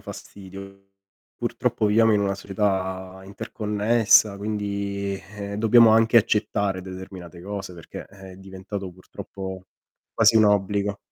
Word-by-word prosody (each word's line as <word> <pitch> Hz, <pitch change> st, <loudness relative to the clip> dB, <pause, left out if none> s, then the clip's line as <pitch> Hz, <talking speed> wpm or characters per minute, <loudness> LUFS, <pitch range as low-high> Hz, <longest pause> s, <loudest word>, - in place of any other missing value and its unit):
fastidio. 100 Hz, 0 st, -11 dB, 0.5 s
Purtroppo 105 Hz, -, -1 dB
viviamo 110 Hz, +1 st, +4 dB
in 105 Hz, -, +3 dB
una 100 Hz, -1 st, 0 dB
società 95 Hz, -1 st, -3 dB
interconnessa, 105 Hz, +1 st, +2 dB
quindi, 100 Hz, -1 st, -3 dB, 0.2 s
ehm, 100 Hz, 0 st, -5 dB
dobbiamo 115 Hz, +1 st, +6 dB
anche 115 Hz, +1 st, +4 dB
accettare 105 Hz, -3 st, +1 dB
determinate 95 Hz, -2 st, -10 dB
cose 95 Hz, 0 st, -6 dB
perché 85 Hz, -2 st, -10 dB
è 95 Hz, -1 st, -13 dB
diventato, 95 Hz, 0 st, -7 dB
purtroppo, 95 Hz, +1 st, -9 dB, 0.5 s
quasi 110 Hz, 0 st, +4 dB
un 110 Hz, -, +6 dB
obbligo. 100 Hz, 0 st, +1 dB
100 Hz, 115 wpm, -24 LUFS, 95-105 Hz, 0.5 s, dobbiamo